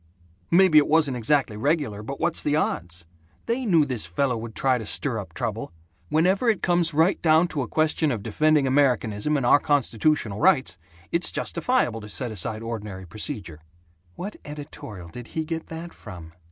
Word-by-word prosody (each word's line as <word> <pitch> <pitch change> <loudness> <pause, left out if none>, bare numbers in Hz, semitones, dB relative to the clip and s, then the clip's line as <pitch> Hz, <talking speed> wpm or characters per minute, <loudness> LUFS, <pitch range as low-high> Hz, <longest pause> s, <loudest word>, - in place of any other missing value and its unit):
"Maybe 175 -3 +6
it 145 - +1
wasn't 150 -4 +3
exactly 125 -1 +1
regular, 120 -3 -1
but 135 +6 -6
what's 170 0 0
the 145 - 0
odds? 90 - -2 0.4
They 240 +1 -1
knew 165 -6 +4
this 125 -10 -3
fellow 125 - 0
would 115 0 -7
try 130 -2 +2
to 110 - -6
stir - - -1
up - - -9
trouble. - - -3 0.4
Whenever 185 +9 +2
it 215 - 0
comes 175 -1 +2
right 160 +5 +2
down 160 +1 +4
to 145 - -2
a 125 - -3
question 155 +1 +1
of 110 -5 -3
defending 150 +6 +2
Americanism 130 -1 +2
and 135 - -1
our 145 - +6
constitutional 140 -5 +1
rights, 130 - +3 0.3
it's 170 +1 +2
justifiable 170 - 0
to 105 - -10
set 125 +1 -4
aside 110 +2 -3
ordinary 105 -5 -6
procedure." 95 - -6 0.6
"What 200 +4 -6
editorial 140 - -9
did 120 +7 -9
he 160 - 0
get 165 0 -4
that 165 +1 -8
from?" 85 -6 -11
140 Hz, 175 wpm, -25 LUFS, 110-160 Hz, 0.6 s, Maybe